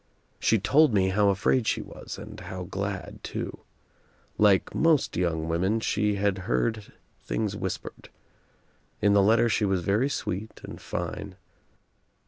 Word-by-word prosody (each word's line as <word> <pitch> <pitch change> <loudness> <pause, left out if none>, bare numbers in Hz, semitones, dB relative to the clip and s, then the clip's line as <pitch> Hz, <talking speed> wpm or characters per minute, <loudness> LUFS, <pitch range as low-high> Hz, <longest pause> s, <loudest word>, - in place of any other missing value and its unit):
She 115 - +3
told 140 +5 +4
me 95 -1 +3
how 100 +1 +3
afraid 105 +5 +2
she - - +1
was - - -9
and - - -9
how 95 -1 -6
glad 100 +2 -5
too. - - -5 0.8
Like 100 -3 +4
most 160 -3 +2
young 80 -2 0
women 95 +7 +1
she 105 -1 0
had 100 -1 0
heard 110 - 0 0.3
things 105 -3 -2
whispered. 95 -2 -6 0.9
In 100 -1 +3
the 100 - +6
letter 110 +4 +4
she 110 -1 +1
was 95 -3 +1
very 105 +9 +2
sweet 110 -5 -4
and - - -9
fine. - - -5
100 Hz, 140 wpm, -27 LUFS, 95-110 Hz, 0.9 s, the